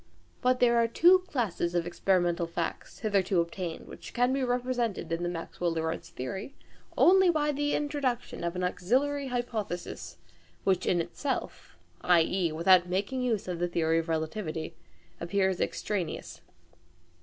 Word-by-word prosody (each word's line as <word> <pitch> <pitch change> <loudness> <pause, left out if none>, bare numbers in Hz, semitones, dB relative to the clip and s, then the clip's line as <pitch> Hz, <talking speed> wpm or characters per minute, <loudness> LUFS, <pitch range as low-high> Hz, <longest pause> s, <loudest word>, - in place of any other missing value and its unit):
But 250 0 +2
there 240 -1 +4
are 230 0 +4
two 350 +10 +6
classes 185 - -1
of 170 -1 +1
experimental 175 -1 +1
facts 170 0 -4
hitherto 200 -4 +2
obtained 170 0 -3
which - - -11
can 245 +1 +3
be 270 -1 0
represented 245 -6 -1
in 165 +1 -1
the 175 - -1
Maxwell 170 0 -3
Lorentz 160 0 -3
theory 190 - -6 0.4
only 380 0 +6
by 300 -3 +2
the 290 0 0
introduction 280 - -2
of 170 +1 -2
an 180 - -2
auxiliary 265 +11 0
hypothesis, 210 - -4 0.5
which 185 -1 +1
in 175 - +3
itself 260 - -4 0.2
i.e. 175 0 +3
without 175 +3 +4
making 200 +8 -1
use 230 -6 -1
of 175 -2 -3
the 175 - +1
theory 165 -1 +1
of 165 0 -4
relativity 160 0 -3 0.5
appears 190 +1 0
extraneous. 195 -5 -3
190 Hz, 145 wpm, -29 LUFS, 170-250 Hz, 0.5 s, two